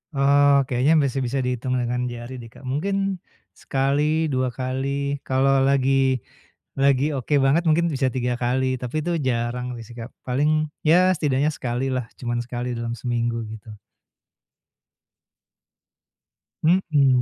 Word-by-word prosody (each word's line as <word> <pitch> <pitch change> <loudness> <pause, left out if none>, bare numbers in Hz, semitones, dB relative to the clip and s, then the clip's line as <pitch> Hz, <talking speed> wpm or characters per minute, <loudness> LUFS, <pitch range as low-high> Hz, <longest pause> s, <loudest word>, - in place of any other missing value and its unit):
Oh 140 0 +5
kayaknya 130 +5 +2
masih 135 -2 0
bisa 130 +3 -1
dihitung 125 0 -1
dengan 125 +1 -1
jari 120 +2 -7
deh 115 -2 -10
Kak, 130 - -12
mungkin 170 +10 -1 0.6
sekali, 150 +4 0
2 130 -3 0
kali 140 +2 -3
kalau 135 +1 +3
lagi 135 -1 +2 0.6
lagi 140 0 +4
oke 130 +3 -3
banget 155 +6 +3
mungkin 170 +2 +3
bisa 135 -1 +1
3 125 -1 0
kali 130 +2 +1 0.2
tapi 125 +4 -5
itu 175 - -1 0.2
jarang 120 +1 -1 0.2
sih 120 - -12
Kak, 115 +3 -7 0.2
paling 140 +4 +1 0.4
ya 170 - +7 0.2
setidaknya 145 -2 +1
sekali 125 +1 -2
lah 125 -2 -2
cuman 120 -1 -2
sekali 125 0 -4
dalam 115 0 -3
seminggu 120 -1 -1 0.2
gitu. 110 +1 -12 2.9
Mhm. 150 -7 +3
130 Hz, 130 wpm, -23 LUFS, 125-140 Hz, 2.9 s, ya